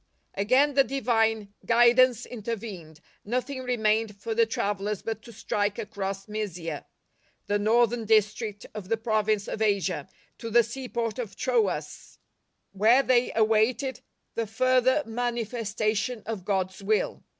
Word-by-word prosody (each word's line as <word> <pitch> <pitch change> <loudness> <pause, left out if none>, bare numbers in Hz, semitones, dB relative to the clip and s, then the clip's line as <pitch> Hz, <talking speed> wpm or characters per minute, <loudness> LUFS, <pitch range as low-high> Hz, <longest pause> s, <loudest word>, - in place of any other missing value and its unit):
Again 255 +9 +3
the 275 0 +5
Divine 225 -6 0
guidance 240 +1 +4
intervened; 205 -9 -7 0.2
nothing 255 +4 -3
remained 220 -4 0
for 225 - -3
the 230 0 +3
travellers 205 -2 -2
but 225 -1 -4
to 235 - -12
strike 205 -1 -2
across 195 -1 -4
Mysia, 180 -8 -5 0.6
the 205 0 0
northern 230 +2 +2
district 215 0 +1
of 205 -3 -8
the 225 - +1
province 215 -2 0
of 220 - -5
Asia, 195 -8 0 0.3
to 230 - -5
the 235 +1 +5
seaport 235 -1 -4
of 210 -5 -5
Troas, 230 -5 -1 0.5
where 225 +7 +4
tliej'' 250 -2 +2
awaited 225 +5 +2 0.3
the 230 -1 -2
further 255 +5 +2
manifestation 225 -1 -2
of 215 -5 -5
God's 190 -1 -1
will. 210 +2 0
220 Hz, 130 wpm, -27 LUFS, 205-240 Hz, 0.6 s, the